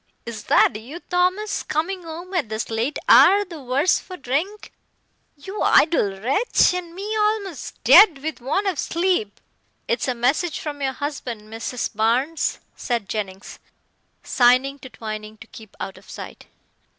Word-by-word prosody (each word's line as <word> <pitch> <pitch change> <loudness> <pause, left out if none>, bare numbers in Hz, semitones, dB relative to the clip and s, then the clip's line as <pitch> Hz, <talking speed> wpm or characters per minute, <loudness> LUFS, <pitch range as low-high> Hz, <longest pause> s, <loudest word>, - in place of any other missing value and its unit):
"Is 220 -3 -7
that - - +4
you, 250 +10 -8
Thomas, 365 +4 +1
coming 355 +5 -2
home 340 +3 -9
at 330 - -1
this 220 +1 -4
late 230 +6 -1
hour 405 +1 +7
the 335 -5 -10
worse 270 +7 +2
for 365 - -10
drink, 320 +11 -3 0.7
you 385 +9 -7
idle 205 - +3
wretch, 280 - +2
and 345 -2 -5
me 415 +3 -4
almost 420 -5 -1
dead 385 -9 +8
with 315 -4 -4
want 295 +11 -1
of 370 -7 -1
sleep." 340 - -1 0.5
"It's 480 - -1
a 255 - -1
message 280 +8 0
from 290 -2 -6
your 265 -1 -1
husband, 260 -5 -5
Mrs. 230 +1 -4
Barnes," 245 +9 +1 0.2
said 235 -5 -3
Jennings, 195 -3 -5 0.6
signing 255 +3 +3
to 260 - -11
Twining 215 -2 -7
to 225 - -13
keep 220 -2 -14
out 195 - -6
of - - -21
sight. - - -10
285 Hz, 150 wpm, -22 LUFS, 235-360 Hz, 0.7 s, dead